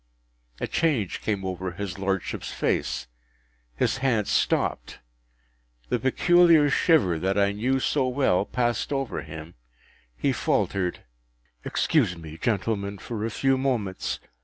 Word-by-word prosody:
A - - -1
change 140 - 0
came 100 -3 -2
over 95 -1 -4
his 100 0 -5
Lordship’s 95 -1 -2
face; - - -1 0.7
his - - +1
hand 125 -6 +1
stopped; - - 0 0.9
the - - +1
peculiar 165 +2 +5
shiver, 135 - +3
that 95 +3 0
I 100 0 +3
knew 125 +6 0
so 135 0 +1
well, 125 -8 +2
passed 120 +4 -1
over 135 -5 -2
him; 80 +1 -9 0.6
he - - +1
faltered, 90 -2 0 0.6
“Excuse 90 - +1
me, 80 -1 -10
gentlemen, 100 -1 -1
for 110 +1 -5
a 115 - -1
few 135 +3 +1
moments. 115 -8 -1
105 Hz, 125 wpm, -26 LUFS, 95-135 Hz, 0.9 s, peculiar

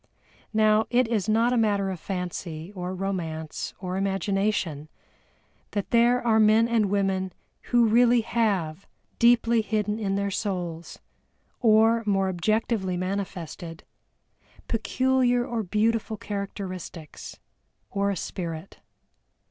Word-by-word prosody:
Now, 215 0 +3
it 245 0 +3
is 220 -3 -1
not 230 +3 +3
a - - +2
matter 200 -3 +1
of 185 - -6
fancy, 180 -1 -5
of 180 0 -5
romance, 165 -5 -4
or 185 0 -4
imagination, 195 -5 -1 0.8
that 205 -2 -3
there 240 +1 +4
are 220 -2 +4
men 220 +1 +5
and 230 -3 +2
women 190 -2 0 0.3
who 240 -1 +4
really 240 +2 +5
have, 200 -7 -1 0.3
deeply 235 -1 +4
hidden 210 0 -1
in 195 -3 -1
their 200 0 -1
souls, 175 -5 -4 0.6
or 225 0 +4
more 195 -1 +2
objectively 190 0 0
manifested, 180 -3 -5 0.8
peculiar 245 +1 +1
or 235 -2 -2
beautiful 220 +2 0
characteristics, 190 -6 -6 0.5
or 200 0 0
a 200 - -1
spirit. 165 0 -6
200 Hz, 115 wpm, -26 LUFS, 185-225 Hz, 0.8 s, men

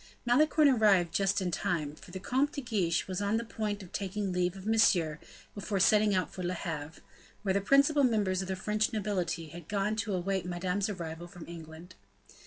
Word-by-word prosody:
Malicorne 300 +5 +4
arrived 205 -9 +4
just 195 0 +1
in 180 -1 -1
time, 155 -3 -1
for 155 - -15
the 190 +2 -6
Comte 265 +9 0
de 280 - -4
Guiche 195 -9 0
was 185 0 -3
on 205 +2 +1
the 230 - -2
point 210 -2 -3
of 180 - -13
taking 195 0 -3
leave 180 0 0
of 190 0 -10
Monsieur 185 -9 +3 0.3
before 205 -1 -3
setting 210 +1 +4
out 185 - -1
for 185 - -6
Le 180 0 -2
Havre, 160 -3 -5 0.4
where 195 -2 +1
the 200 - +1
principal 280 +6 +4
members 205 -6 +2
of 190 - -5
the 190 - -2
French 210 +3 0
nobility 190 -6 -2
had 170 +1 -10
gone 205 +1 0
to 210 -3 -1
await 190 +1 -1
Madame's 180 +3 -2
arrival 170 -3 -6
from 175 -1 -11
England. 165 +1 -10
190 Hz, 195 wpm, -30 LUFS, 175-215 Hz, 0.4 s, Malicorne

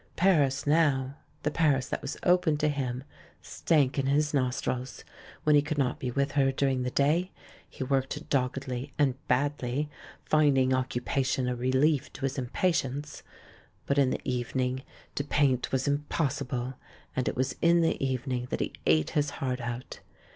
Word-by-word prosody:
Paris 145 -7 +3
now 145 -4 +2 0.2
— - - -35
the 150 - 0
Paris 145 -5 +2
that - - -3
was 140 - -5
open 180 -4 +3
to 150 +1 +1
him 130 -3 -2 0.2
— - - -27
stank 145 -4 +1
in 135 - 0
his 150 +2 +2
nostrils. 130 -1 -1 0.4
When 150 -1 +5
he 145 - +6
could 150 +1 -3
not 135 -3 0
be 125 - -2
with 140 +3 0
her 135 -2 +3
during 135 -1 0
the 125 - -1
day, 155 +8 +2 0.4
he - - -5
worked 135 +3 -1
doggedly, 130 0 -2
and 140 -3 +3
badly, 140 +1 0 0.3
finding 135 -4 +3
occupation 130 0 0
a 125 - 0
relief 130 +4 +1
to - - -11
his 135 +1 -1
impa 135 +8 +1
tience; 145 +1 -3 0.6
but 140 0 +1
in 135 -2 +4
the - - -2
evening, 125 0 -1 0.3
to 140 - -2
paint 140 -3 +1
was 130 0 0
impossible 140 -3 -1 0.2
— - - -28
and 130 - -1
it - - -1
was 130 +1 -1
in 170 0 +5
the 165 -4 +1
evening 130 -1 -2
that - - -2
he - - -2
ate 80 0 +3
his 145 -1 +1
heart 125 -2 -2
out. 120 +1 -5
135 Hz, 175 wpm, -28 LUFS, 130-145 Hz, 0.6 s, he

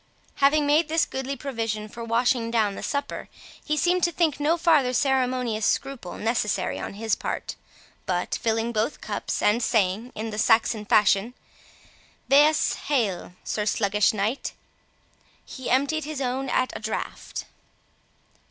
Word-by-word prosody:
Having 290 +2 +4
made 300 +2 +3
this 325 +1 +2
goodly 265 +1 -4
provision 225 -5 -3
for 235 +2 -8
washing 230 +1 +1
down 220 -3 +1
the - - -7
supper, 285 0 -3 0.3
he 305 - -1
seemed 355 +5 +2
to 345 - +2
think 315 -4 +1
no 310 +4 +2
farther 300 -7 +3
ceremonious 255 -4 +1
scruple 270 -5 -1
necessary 210 -4 -1
on - - -6
his 220 +1 -2
part; - - -3 0.5
but 180 -1 -1
filling 225 +1 0
both 225 +5 -1
cups, - - -3
and 215 +3 +3
saying, 220 +1 +1
in 220 +1 -4
the 210 - -4
Saxon 225 -1 +3
fashion, 210 +3 +3 0.9
"'Waes 295 +3 +4
hael', 215 -11 0
Sir 210 -1 -2
Sluggish 205 -1 +2
Knight!" 215 +5 -2 0.9
he 260 - -7
emptied 285 +4 +1
his 305 -2 -5
own 260 0 -2
at 255 +1 +1
a - - -4
draught. 220 0 -5
240 Hz, 145 wpm, -25 LUFS, 215-280 Hz, 0.9 s, Having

